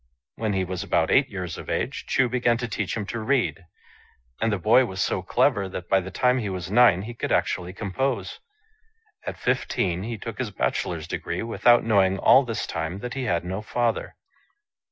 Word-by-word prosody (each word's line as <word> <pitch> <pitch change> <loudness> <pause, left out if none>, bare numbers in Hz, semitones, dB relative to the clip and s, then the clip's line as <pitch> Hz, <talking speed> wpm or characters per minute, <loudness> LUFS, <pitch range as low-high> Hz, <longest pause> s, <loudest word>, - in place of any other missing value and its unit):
When 110 -2 -2
he 95 -1 +1
was 90 -1 -4
about 85 -5 +1
eight 135 0 +4
years 90 -5 -5
of - - -9
age, - - -2
Chu 130 - +2
began 120 -1 +1
to 120 0 -3
teach 105 -1 -3
him 105 - -3
to 115 - -4
read; 115 -5 0 0.8
and 115 - +2
the 100 - +1
boy 110 +8 +5
was 95 -4 -7
so - - 0
clever 100 -2 +1
that 90 -2 -7
by 95 - +4
the 95 0 -6
time 125 +4 +2
he 105 -4 -3
was 90 -1 -5
nine 105 -5 +5
he 120 +3 -7
could - - -4
actually 90 0 0
compose. 100 +1 -3 0.9
At - - -4
fifteen 90 -1 0
he 115 +3 -4
took 115 +1 -7
his 125 -4 -2
bachelor's 100 - -2
degree, - - -3
without 120 +1 +4
knowing 95 -4 +3
all 135 - +6
this 115 -3 -3
time 80 +2 -4
that 125 0 -5
he 135 -2 -3
had 85 -6 0
no 95 +3 -3
father. 115 +1 -1
105 Hz, 195 wpm, -25 LUFS, 95-120 Hz, 0.9 s, all